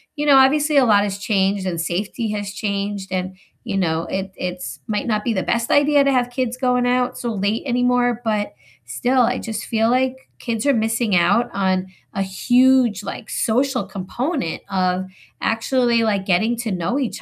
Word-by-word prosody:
you 295 - -2
know, 280 -2 +6
obviously 295 +3 +4
a 270 - +6
lot 205 -3 +4
has 200 -1 -3
changed 195 -1 0
and 170 -2 -2
safety 205 +6 -2
has 205 -1 -4
changed 200 -1 -3
and, 185 0 -3 0.3
you 210 -5 -3
know, 165 -3 0
it 190 +1 -4
it's 180 0 -5
might 210 -1 -2
not 215 -2 0
be 235 - 0
the 190 - -1
best 235 0 -1
idea 285 0 +4
to 275 - +2
have 245 -2 +1
kids 250 -1 -2
going 250 -1 +1
out 250 0 0
so 240 -1 -3
late 205 +2 -1
anymore, 245 -1 +1
but 210 -2 -1 0.3
still, 255 0 +1
I 235 - +2
just 220 -2 -5
feel 225 0 +1
like 255 +1 +1 0.2
kids 230 0 -3
are 280 - +4
missing 225 -2 0
out 180 +8 +3
on 190 -1 0 0.3
a 195 0 -1
huge, 245 +2 +3
like, 215 - -7
social 250 0 0
component 200 - -4
of 185 -1 0 0.3
actually 235 +1 +1
like 200 -3 0
getting 215 +6 +1
to 230 -2 -3
know 185 +7 -1
each 260 -5 -3
220 Hz, 185 wpm, -20 LUFS, 195-250 Hz, 0.3 s, know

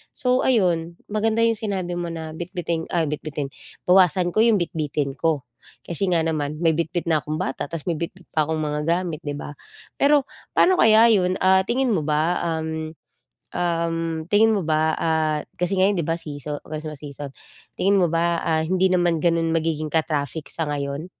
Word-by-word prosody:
So 255 -2 +2
ayun, 175 -9 +2 0.2
maganda 220 +2 +1
'yung 230 0 +3
sinabi 190 -5 -3
mo 175 - -3
na 160 -1 -6
bitbitin, 170 -1 -3
ay 165 -2 +2
bitbitin- 145 -2 -4 0.4
bawasan 180 -1 +4
ko - - +1
'yung 230 -2 +5
bitbitin 150 -4 -2
ko. 160 -5 +1 0.4
kasi 175 +3 -2
nga 170 -2 +2
naman 150 -2 -2
may 165 - +5
bitbit 170 +2 -2
na 155 - +3
akong 155 +2 -4
bata 135 -1 -3
tapos 165 -3 -5
may 175 - 0
bitbit 175 +2 -6
pa 155 -2 +1
akong 160 0 -1
mga 150 -1 -2
gamit 170 -2 0
'di 145 -3 -4
ba? 145 - -7 0.5
Pero 285 0 +4 0.3
paano 370 - +5
kaya 220 +1 +7
'yun? 185 -3 +2
Ah, 190 0 +5
tingin 255 0 +1
mo 175 - +1
ba 155 +3 +1 0.2
um, 160 0 -4 0.6
um, 165 -1 -1
tingin 220 +2 +5
mo 200 - 0
ba, 155 0 +2
ah, 160 -2 +1 0.2
kasi 180 +2 0
ngayon 195 +2 +4
'di 155 - -3
ba 165 - 0
seaso 150 -2 -6
Christmas 155 -1 -6
season. 145 -1 -7 0.5
Tingin 200 +2 +3
mo 175 - +3
ba, 170 0 +1
ah, 160 -1 +1
hindi 185 +2 +2
naman 175 -3 +2
gano'n 165 -1 +2
magiging 155 -2 -1
ka-traffic 155 -1 -1
sa 165 - -2
ngayon? 140 +2 -3
165 Hz, 180 wpm, -23 LUFS, 155-185 Hz, 0.6 s, kaya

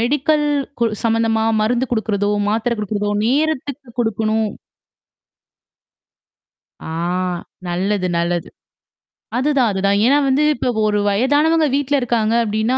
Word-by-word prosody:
Medical 295 +5 +1 0.3
கு 235 - +2 0.2
சம்மந்தமா 225 -1 +1 0.2
மருந்து 240 +4 +1
குடுக்குறதோ, 210 -3 0 0.2
மாத்திரை 230 +3 0
குடுக்குறதோ 210 0 -2 0.2
நேரத்துக்கு 280 -1 -1
குடுக்கணும். 220 -1 0 2.4
ஆ 160 - -5 0.8
நல்லது 185 +2 -1
நல்லது. 170 0 -1 0.9
அதுதான் 265 -3 +2
அதுதான். 200 +1 +1
ஏன்னா 275 +4 +4
வந்து 280 +3 +2
இப்ப 245 +1 -1 0.2
ஒரு 210 0 +1
வயதானவங்க 290 +9 +2
வீட்ல 285 0 0
இருக்காங்க 230 -2 0
அப்ப்டின்னா. 220 +4 0
230 Hz, 105 wpm, -19 LUFS, 210-265 Hz, 2.4 s, ஏன்னா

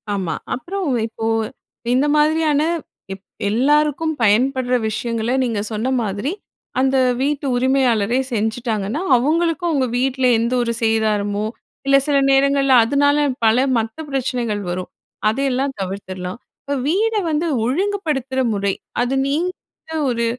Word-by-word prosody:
ஆமா. 185 -4 -2 0.2
அப்புறம் 365 +7 -4 0.2
இப்போ, 225 0 -6 0.7
இந்த 265 +3 +3
மாதிரியான 305 -1 +3 0.5
எப் 195 0 -12 0.3
எல்லாருக்கும் 295 +7 +2
பயன்படுற 250 +4 +2
விஷயங்கள 230 +1 -2
நீங்க 230 -4 -1
சொன்ன 220 +4 -1
மாதிரி, 205 - -2 0.5
அந்த 265 +1 +2 0.2
வீட்டு 285 +1 -1
உரிமையாளரே 245 -3 +2
செஞ்சுட்டாங்கன்னா, 220 - -1
அவுங்களுக்கும் 330 +6 +1
உங்க 265 -2 +2
வீட்ல 260 +1 0
எந்த 235 +2 0
ஒரு 235 -1 -1
சேதாரமோ, 215 -2 +1 0.4
இல்ல 275 - +6
சில 290 -1 +3
நேரங்கள்ல 275 0 +3
அதுனால, 285 +4 +3 0.3
பல 220 +1 +4 0.2
மத்த 225 0 -2
பிரச்சனைகள் 245 -6 -1
வரும். 180 +1 -4 0.4
அதயெல்லாம் 270 +3 -1
தவிர்த்துர்லாம். 185 0 -5 0.2
இப்ப 285 0 -2
வீட 430 +7 +1 0.2
வந்து 315 +2 0 0.2
ஒழுங்குபடுத்துற 295 - -1
முறை, 200 -1 0 0.3
அது 250 +2 -1
நீங்க 325 +6 0 0.6
ஒரு 235 -1 0
255 Hz, 120 wpm, -20 LUFS, 220-285 Hz, 0.7 s, இல்ல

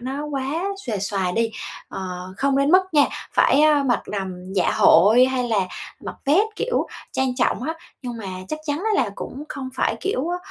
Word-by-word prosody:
nó 270 +4 -4
quá 285 +4 -2 0.2
xuề 215 -4 -1
xòa 190 -2 -1
đi. 225 +3 0 0.4
Ờ, - - -6 0.4
không 275 0 +1
đến 280 +2 +3
mức 370 +1 +7
nha, 290 -2 +6 0.3
phải, 285 - +4
a, 300 -2 +5
mặc 250 -3 +1
đầm 190 -2 -5
dạ 185 - +2
hội 230 +5 +6
hay 255 -2 -1
là 220 -3 +2 0.4
mặc - - -6
vét, 315 +9 +4
kiểu, 480 +1 0 0.3
trang 260 -1 0
trọng 245 -2 +1
á. 320 +4 -2 0.3
Nhưng 245 -2 -5
mà 205 - -6 0.2
chắc 310 - -3
chắn 290 0 -1
á 420 -7 +2
là 205 - -3
cũng 280 +3 -7
không 265 -2 -5
phải, - - 0
kiểu 345 -6 -1
á, 355 - -1
265 Hz, 200 wpm, -22 LUFS, 225-295 Hz, 0.4 s, mức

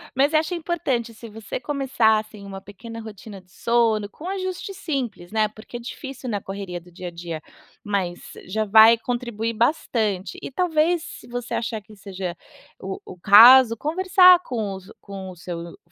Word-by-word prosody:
Mas 280 +4 +2
acho 315 +3 +2
importante 310 -9 -2
se 225 +1 -11
você 220 +1 -6
começar, 260 -5 +1
assim, 215 -1 -8
uma 195 -1 -8
pequena 225 +4 -10
rotina 210 -2 -10
de 180 0 -28
sono 225 -1 +1
com 320 - -9
ajuste 375 0 -4
simples, 250 - -4
né, 215 -1 +2
porque 215 +3 -10
é - - -12
difícil 260 +1 -8
na 210 -3 -1
correria 195 -2 -6
do 175 +1 -17
dia 180 +1 -7
a - - -6
dia, 170 -2 -6 0.4
mas 190 -4 -2 0.2
já 215 +3 -2
vai 220 +2 +7
contribuir 230 -2 -3
bastante, 220 - -1
e - - -6
talvez 330 +2 +1
se - - -10
você 245 0 -5
achar 225 -1 -2
que 210 +1 -17
seja 190 -3 -6 0.4
o 190 0 -6
o 180 - -10
caso, 230 +6 +8
conversar 365 - +5
com 220 -6 -3
o - - -9 0.2
com 195 -2 -8
o 180 - -12
seu 170 0 -7
220 Hz, 175 wpm, -23 LUFS, 195-260 Hz, 0.4 s, caso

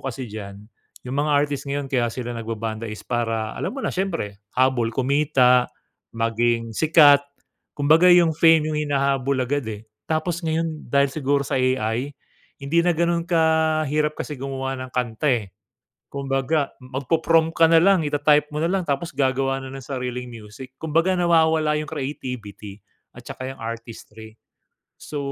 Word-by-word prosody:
kasi 130 -1 -5
diyan, 105 -1 -9 0.4
yung 130 - -4
mga 150 - -1
artist 145 -1 0
ngayon 140 0 -2
kaya 125 -3 0
sila 120 0 -5
nagba-banda 115 -1 -5
is 105 - -9
para 115 -2 -2
alam - - -3
mo 275 - -7
na, - - -3
syempre, 165 - -3 0.2
habol 130 -3 +2
kumita, 130 -1 +2 0.4
maging 115 0 -1
sikat. 150 0 +6 0.6
Kumbaga, 160 +5 +5
yung 170 -3 +5
fame 160 -1 +4
yung 150 - -1
hinahabol 140 -2 0
agad, 130 0 -1
eh. 105 +1 -9 0.2
Tapos 165 +2 -1
ngayon 160 -1 -3
dahil 140 0 +3
siguro 140 -1 0
sa - - -2
AI 130 0 0 0.5
hindi 145 +5 +1
na 175 - +2
ganun 170 +1 +1
kahirap 155 -2 +1
kasi 150 - -4
gumawa 135 0 -4
ng 130 - -9
kanta 125 +2 -2
eh. 115 -5 0 0.7
Kumbaga 140 +2 -1
magpo-prompt 160 +5 +1
ka 165 - +7
nalang. 175 +2 +5
Ita-type 145 0 +3
mo - - -2
nalang 185 +3 0
tapos 145 +4 -2
gagawa 135 0 0
na - - -8
ng 135 - -8
sariling 125 -2 -4
music. 115 +3 -11
Kumbaga, 165 +3 +1
nawawala 160 -3 +3
yu'ng 150 0 -5
creativity 125 -8 -6 0.4
at - - -14
saka 130 0 -6
yung - - -21
artistry. 115 -1 -9 0.6
So, 150 - -7
140 Hz, 150 wpm, -22 LUFS, 120-155 Hz, 0.7 s, ka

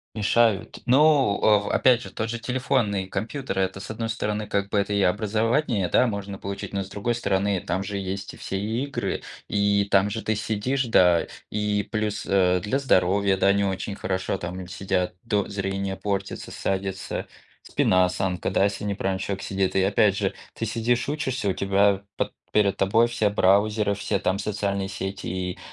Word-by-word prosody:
Мешают. 110 -1 +2
Ну 135 -4 +4
в 105 -1 +3
опять 125 -2 +4
же, - - -8
тот 110 0 -3
же 120 +1 -3
телефонный 115 -5 0
компьютер- 110 +1 -3
это 95 0 -1
с - - -8
одной 115 +1 -3
стороны, 105 -1 -2
как 100 -1 -1
бы 105 - -2
это 100 +1 0
и 100 - +2
образование, 110 - +1
да, 125 - +4
можно 100 -2 -4
получить. 100 +1 -6
Но 100 - 0
с 95 - -13
другой 115 +4 -1
стороны, 100 -3 0
там 95 - -2
же 100 +1 -4
есть 95 0 -4
и - - -12
все 95 0 -4
игры, 115 +7 -2 0.3
и 100 0 +2
там 100 +1 +4
же 110 +2 -3
ты 110 - -1
сидишь, 110 +6 -1
да. 90 -7 +4 0.2
И 105 -1 -1
плюс, 110 0 -2
э, 90 -2 +3
для 130 +7 0
здоровья, 100 -5 +2
да, 100 +1 +4
не 100 0 +2
очень 100 +1 -2
хорошо 95 0 -2
там, 90 +1 -6
м, 90 - -8
сидят. 90 -1 -1
До 105 -3 0
зрение 95 -1 -3
портится, 100 -1 -3
садится, 95 0 -3 0.4
спина, 95 0 +3
осанка, 90 0 -1
да, - - +3
если 100 0 -1
не 100 - -1
правильно 95 -1 -1
человек 100 0 -4
сидит. 95 -1 -1
И 95 - +4
опять 100 0 +3
же, 95 -2 0 0.2
ты 115 - -4
сидишь, 115 +3 0
учишься, 130 -8 -1
у 95 - +1
тебя 100 0 +2 0.2
по - - 0 0.2
перед 100 -2 +3
тобой 110 +5 +3
все 110 -4 +1
браузеры, 100 +1 +3
все 100 0 -1
там 95 +2 0
социальные 100 -2 -2
сети, 95 +1 -5
и 90 0 -3
100 Hz, 185 wpm, -25 LUFS, 95-110 Hz, 0.4 s, Ну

